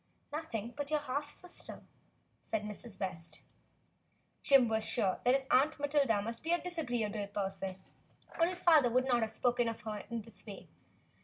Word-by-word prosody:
"Nothing 240 -8 -4
but 285 -1 -3
your 305 -1 +1
half 290 +1 -2
sister," 360 +3 -6 0.6
said 220 -2 -2
Mrs. 210 +1 -6
West. 180 -3 -4 1.0
Jim 270 -3 +6
was 220 -1 +1
sure 195 -5 +1
that 250 +2 +5
his 270 -1 0
Aunt 290 +4 +4
Matilda 280 -8 +2
must 230 +2 -4
be 325 - -2
a 345 - +3
dis 350 -1 -4
agreeable 220 -7 -1
person, 195 -2 -3 0.6
or 335 - +5
his 360 0 0
father 310 -7 +6
would 255 +2 +2
not 245 -3 +3
have 220 - +1
spoken 240 0 +1
of 230 0 -6
her 210 -1 -4
in 230 -2 -3
this 225 0 -11
way. 205 -3 -10
240 Hz, 175 wpm, -34 LUFS, 210-290 Hz, 1.0 s, Jim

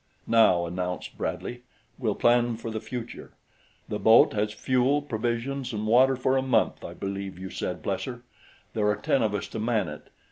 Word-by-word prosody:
"Now," 100 -7 +4
announced 90 +1 -4
Bradley, 120 0 -4 0.4
"we'll 110 -5 0
plan 120 -1 +3
for 115 0 -6
the 110 - -3
future. 120 +1 -7 0.5
The 105 - -3
boat 110 +1 +6
has 105 0 0
fuel, 130 +6 +1
provisions 120 +1 -2
and 105 0 -3
water 130 +4 +5
for 130 +1 +1
a - - +2
month, 130 -1 +1
I - - -7
believe 100 -1 -5
you 95 0 -7
said, - - -4
Plesser; - - -3 0.5
there 105 -2 +1
are 105 - +3
ten 135 - +1
of 105 -2 +1
us 100 - -3
to - - -5
man 110 -4 +1
it. 75 - -10
115 Hz, 180 wpm, -27 LUFS, 105-125 Hz, 0.5 s, boat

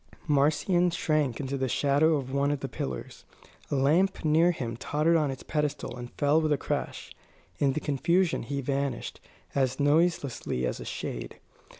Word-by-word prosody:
Marcion 155 +5 +3
shrank 155 -7 0
into 140 -1 -3
the 130 -1 -1
shadow 145 +5 +3
of 135 -2 -4
one 140 +1 +2
of 145 -1 -1
the 135 - -3
pillars. 65 - -6 0.5
A - - -1
lamp 165 +8 +2
near 160 +3 +4
him 120 -9 -3
tottered 150 +7 +1
on 155 -3 +2
its 135 - -6
pedestal 150 -1 -2
and 120 -1 -7
fell 145 +2 +3
with 155 -1 0
a 145 - +3
crash. - - -4 0.5
In 140 -2 +2
the 155 - -1
confusion 170 +5 +1
he 140 +3 -3
vanished, 140 +1 -2 0.3
as 130 -1 0
noiselessly 145 - +1
as - - -2
a - - -7
shade. - - -5
145 Hz, 170 wpm, -28 LUFS, 135-155 Hz, 0.5 s, near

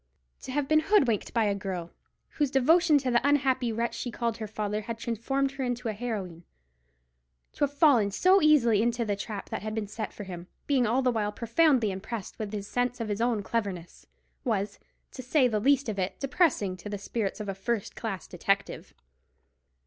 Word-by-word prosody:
To - - -7
have 285 +1 -1
been 310 +1 +5
hoodwinked 305 - +2
by 230 -1 +2
a 205 -1 +2
girl, 185 -4 -5 0.4
whose 290 -3 0
devotion 310 +5 +4
to 260 -3 -1
the 240 - +3
unhappy 270 -4 +2
wretch 230 +2 -1
she 245 - -4
called 235 -1 -2
her 220 - -5
father 210 0 -3
had 230 +1 -5
transformed 255 +4 -1
her 275 -1 -4
into 245 -1 -2
a - - -2
heroine—to 60 - -9
have 285 0 -1
fallen 270 -10 +5
so 370 - +4
easily 245 -9 +5
into 235 0 0
the 205 -2 0
trap 200 0 -6
that - - -3
had 215 0 -4
been 220 -2 -2
set 210 +1 -5
for 205 - -8
him, 180 -2 -8 0.2
being 260 -5 +2
all 250 +4 +1
the 250 - +3
while 210 -3 -1
profoundly 235 0 +2
impressed 195 +3 -6
with 215 -2 -3
the 205 -1 -4
sense 245 +4 -1
of 225 -2 -3
his 205 +1 -2
own 235 -3 +1
cleverness—was, 200 +1 -4 0.3
to 255 - -8
say 255 +1 +3
the 215 -3 0
least 275 +4 +3
of 210 -3 -3
it, 185 0 -2
depressing 275 - +1
to 195 +4 -8
the 205 - -3
spirits 200 +1 -3
of 210 - -5
a 195 - -2
first 205 +2 -3
class 205 -5 -4
detective. 195 +3 -2
225 Hz, 195 wpm, -28 LUFS, 200-255 Hz, 0.4 s, been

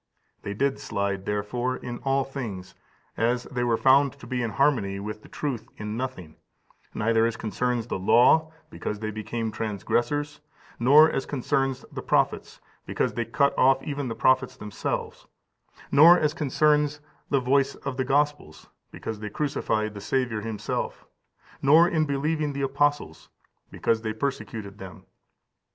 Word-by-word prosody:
They 100 - -5
did 135 +4 0
slide, 100 -2 -3
therefore, 120 +5 -2
in 120 -1 -7
all 135 0 +1
things, 115 -9 -6 0.4
as 120 +2 +1
they 125 -2 -3
were 120 -2 +2
found 135 +2 +4
to 140 - -14
be 125 -1 -2
in 115 - -1
harmony 110 -6 +1
with 105 +1 -6
the - - -16
truth 135 -6 -4
in 105 0 -5
nothing: 115 -11 -6 0.6
neither 115 +1 +2
as 115 -1 -4
concerns 120 +2 -1
the 115 - -4
law, 155 +11 +4 0.2
because 105 - -4
they 110 +1 -4
became 110 +1 -4
transgressors; 120 +8 -2 0.4
nor 145 +6 +7
as 135 - -2
concerns 135 -1 -1
the - - -6
prophets, - - 0 0.3
because - - -1
they 120 - -2
cut 140 +5 +1
off 135 +1 +4
even 140 -2 -3
the 115 - -4
prophets 130 0 +2
themselves; 105 -1 -5 0.6
nor 165 +5 +8
as 150 -2 +1
concerns 150 0 +1 0.3
the 140 - +3
voice 135 +2 +1
of 135 -2 -6
the 130 - +1
Gospels, 145 - -1 0.2
because 110 -2 -6
they 105 0 -5
crucified 110 -5 -1
the 100 - -8
Saviour 125 -1 -1
Himself; 110 -1 -4 0.6
nor 155 +5 +6
in 160 -3 +1
believing 150 +1 -1
the 140 0 -3
apostles, 145 - -1 0.4
because 115 -1 0
they 110 -1 -3
persecuted 110 -5 -4
them. 95 -4 -10
125 Hz, 150 wpm, -26 LUFS, 110-140 Hz, 0.6 s, nor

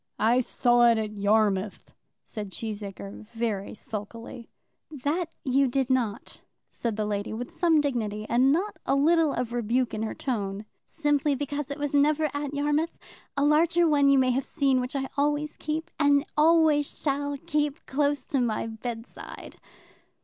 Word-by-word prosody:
"I 235 +4 +3
saw 240 -1 +3
it 230 - +3
at 215 -1 -2
Yarmouth," 205 -1 0 0.3
said 210 -2 -6
Cheesacre, 205 0 -7
very 225 -4 -2
sulkily. 225 +3 -8 0.4
"That 305 +4 -2 0.2
you 270 +1 +3
did 265 +1 0
not," 240 -2 -2 0.3
said 230 -3 -3
the 215 0 -1
lady 205 0 -3
with 240 +3 -5
some 335 -3 +3
dignity, 220 -7 -2
and 255 +4 +4
not 375 +8 0
a - - +3
little 320 +2 +4
of 240 -2 -3
rebuke 240 +1 0
in 215 - -3
her 220 - -3
tone; 205 -5 -3 0.2
"simply 295 -2 +1
because 285 +1 -4
it 280 - -4 0.2
never 295 +2 +3
was 305 - 0
at 285 -1 -3
Yarmouth. 295 +3 0 0.4
A 285 - +3
larger 335 +3 +4
one 285 -2 +4
you 275 - +5
may 255 -1 +3
have 265 +2 0
seen, 270 -4 +1
which 250 +3 -5
I 270 -1 -1
always 295 +1 0
keep, 315 +2 -4
and 285 0 +4
always 310 -2 +4
shall 285 0 -1
keep, 295 +1 -2
close 285 +1 0
by 275 - 0
my 230 -3 0
bedside." 225 +1 -8
270 Hz, 160 wpm, -27 LUFS, 225-295 Hz, 0.4 s, you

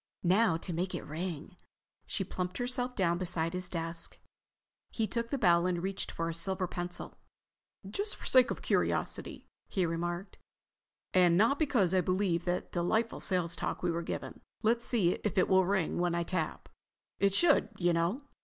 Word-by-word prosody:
"Now 190 0 +4
to 175 +2 -5
make 180 +3 -2
it - - -5
ring." 165 +2 -5 0.5
She 195 - -1
plumped 180 0 -4
herself 250 0 -2
down 175 -3 +1
beside 170 -2 -1
his 180 0 -2
desk. 165 -1 -4 0.7
He 225 - -1
took 235 +1 -2
the 280 - -1
bell 175 -6 +4
and 175 -1 -1
reached 195 0 -3
for 165 - -3
a 165 - -2
silver 185 +2 0
pencil. 175 0 -5 0.7
"Just 405 - -2
for - - -13
the - - -1
sake 255 -1 +6
of - - -4
curiosity," - - -1 0.2
he 190 -4 0
remarked, 175 +3 -3 0.7
"and 175 -2 +5
not 230 +8 +3
because 245 - +2
I 185 - +4
believe 180 -2 0
that 180 0 -2
delightful 220 +6 0
sales 180 -3 +1
talk - - -4
we 175 - +2
were 170 +1 -2
given, 170 - -5 0.2
let's 235 +2 +2
see 200 -8 +3
if 210 -1 -2
it 185 - +4
will 190 -1 +4
ring 190 -5 0
when 175 -1 +1
I 170 - 0
tap. 165 -3 -2 0.5
It 200 -1 +3
should, 325 +2 +4
you 175 -2 +2
know." 170 +11 0
185 Hz, 180 wpm, -31 LUFS, 170-205 Hz, 0.7 s, sake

